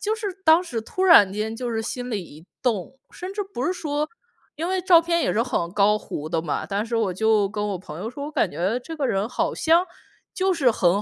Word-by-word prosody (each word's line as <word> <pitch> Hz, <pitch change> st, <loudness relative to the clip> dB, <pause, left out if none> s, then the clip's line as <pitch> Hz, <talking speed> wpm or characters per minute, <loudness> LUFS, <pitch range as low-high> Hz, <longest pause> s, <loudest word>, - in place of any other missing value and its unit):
就 430 Hz, +1 st, 0 dB
是 445 Hz, -2 st, -5 dB, 0.2 s
当 320 Hz, +2 st, +6 dB
时 245 Hz, -11 st, -4 dB
突 370 Hz, +11 st, -4 dB
然 210 Hz, -, +7 dB
间 220 Hz, +2 st, -3 dB
就 245 Hz, -1 st, -3 dB
是 225 Hz, -, -1 dB
心 245 Hz, +2 st, -5 dB
里 205 Hz, -4 st, -2 dB
一 160 Hz, +1 st, -14 dB, 0.2 s
动， 245 Hz, +2 st, -1 dB
甚 365 Hz, +2 st, -7 dB
至 415 Hz, -, -4 dB
不 380 Hz, -10 st, -5 dB
是 -, -, +1 dB
说 300 Hz, -4 st, -2 dB, 0.5 s
因 330 Hz, +3 st, -2 dB
为 375 Hz, 0 st, 0 dB
照 350 Hz, -2 st, +7 dB
片 335 Hz, 0 st, 0 dB
也 -, -, +1 dB
是 230 Hz, -, +2 dB
很 175 Hz, -9 st, -2 dB
高 210 Hz, +1 st, +3 dB
糊 155 Hz, -5 st, -6 dB
的 165 Hz, -1 st, -1 dB
嘛。 155 Hz, -, -3 dB
但 205 Hz, +2 st, -1 dB
是 230 Hz, 0 st, -5 dB
我 210 Hz, -5 st, +1 dB
就 215 Hz, 0 st, +2 dB
跟 210 Hz, 0 st, -3 dB
我 195 Hz, -3 st, -3 dB
朋 160 Hz, -3 st, -9 dB
友 220 Hz, +5 st, -4 dB
说， 280 Hz, +3 st, -6 dB
我 -, -, -6 dB
感 -, -, +1 dB
觉 195 Hz, +8 st, -1 dB
这 325 Hz, -, -6 dB
个 275 Hz, -, +1 dB
人 195 Hz, 0 st, 0 dB
好 325 Hz, +6 st, -1 dB
像 335 Hz, +3 st, +3 dB, 0.5 s
就 380 Hz, 0 st, +1 dB
是 275 Hz, -8 st, +3 dB
很 185 Hz, -2 st, +2 dB
240 Hz, 265 characters per minute, -24 LUFS, 200-330 Hz, 0.5 s, 然